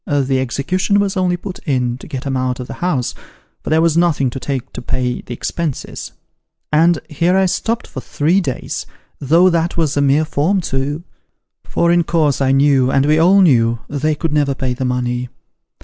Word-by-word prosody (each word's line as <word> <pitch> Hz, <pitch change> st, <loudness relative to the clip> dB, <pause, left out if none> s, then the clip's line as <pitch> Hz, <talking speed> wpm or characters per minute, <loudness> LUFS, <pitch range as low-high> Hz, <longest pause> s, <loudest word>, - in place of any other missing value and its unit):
The 135 Hz, -2 st, +1 dB
execution 180 Hz, +10 st, 0 dB
was 200 Hz, -1 st, 0 dB
only 180 Hz, -2 st, +1 dB
put 185 Hz, +1 st, -7 dB
in, 125 Hz, -4 st, -1 dB
to -, -, -11 dB
get 130 Hz, 0 st, -6 dB
'em 135 Hz, -1 st, -1 dB
out 130 Hz, 0 st, -1 dB
of 125 Hz, -, -5 dB
the -, -, -7 dB
house, 150 Hz, -9 st, 0 dB, 0.5 s
for -, -, -5 dB
there 160 Hz, +1 st, +3 dB
was 165 Hz, -2 st, +2 dB
nothing 165 Hz, -7 st, +2 dB
to 135 Hz, -, -6 dB
take 130 Hz, -2 st, -4 dB
to -, -, -6 dB
pay 125 Hz, 0 st, -2 dB
the -, -, -13 dB
expenses; 160 Hz, +2 st, -4 dB, 0.6 s
and 165 Hz, +2 st, +4 dB
here 170 Hz, +5 st, +1 dB
I 190 Hz, -, +3 dB
stopped 220 Hz, +5 st, -1 dB
for 130 Hz, -, -8 dB
three 165 Hz, +10 st, +1 dB
days, 135 Hz, -8 st, -4 dB, 0.3 s
though 165 Hz, +6 st, +4 dB
that 170 Hz, 0 st, 0 dB
was 155 Hz, -3 st, +1 dB
a 145 Hz, -, +2 dB
mere 140 Hz, +3 st, +3 dB
form 160 Hz, +6 st, +1 dB
too: 145 Hz, 0 st, -3 dB, 0.6 s
for, 170 Hz, -, +1 dB
in 175 Hz, 0 st, +3 dB
course, 155 Hz, -5 st, +1 dB
I 135 Hz, -1 st, +3 dB
knew, 135 Hz, -2 st, +3 dB
and 135 Hz, +1 st, +2 dB
we 155 Hz, +1 st, +3 dB
all 190 Hz, +4 st, +5 dB
knew, 120 Hz, -9 st, +3 dB
they 150 Hz, +2 st, -1 dB
could 150 Hz, 0 st, -3 dB
never 145 Hz, -2 st, +1 dB
pay 130 Hz, -1 st, -2 dB
the 130 Hz, +1 st, -3 dB
money. 125 Hz, 0 st, -2 dB
145 Hz, 195 wpm, -17 LUFS, 130-170 Hz, 0.6 s, all